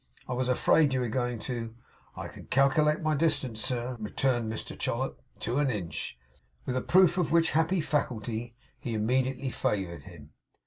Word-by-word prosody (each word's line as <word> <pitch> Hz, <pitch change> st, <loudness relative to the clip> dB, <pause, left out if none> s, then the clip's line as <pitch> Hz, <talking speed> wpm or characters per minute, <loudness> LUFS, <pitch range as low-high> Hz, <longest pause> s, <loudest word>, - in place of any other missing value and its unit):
'I 130 Hz, -, -2 dB
was 125 Hz, 0 st, 0 dB
afraid 140 Hz, +2 st, +4 dB
you -, -, +2 dB
were 120 Hz, -, -1 dB
going 125 Hz, 0 st, -1 dB
to 115 Hz, -3 st, -4 dB, 0.2 s
' -, -, -32 dB
'I -, -, -4 dB
can -, -, -12 dB
calc'late 150 Hz, +3 st, +3 dB
my 155 Hz, 0 st, +2 dB
distance, 140 Hz, -7 st, +1 dB
sir,' 125 Hz, 0 st, -2 dB
returned 115 Hz, +1 st, 0 dB
Mr 110 Hz, -, -5 dB
Chollop, -, -, -2 dB, 0.2 s
'to 120 Hz, +5 st, 0 dB
an 145 Hz, -2 st, +2 dB
inch.' 95 Hz, -, -4 dB, 0.5 s
With 125 Hz, -, -2 dB
a 130 Hz, -, +1 dB
proof 185 Hz, +2 st, +5 dB
of 165 Hz, -4 st, 0 dB
which 165 Hz, 0 st, +4 dB
happy 160 Hz, +3 st, +2 dB
faculty 120 Hz, -5 st, -2 dB, 0.2 s
he 120 Hz, -3 st, -3 dB
immediately 130 Hz, +4 st, 0 dB
favoured 85 Hz, -10 st, -2 dB
him. -, -, -13 dB
125 Hz, 175 wpm, -29 LUFS, 115-150 Hz, 0.5 s, proof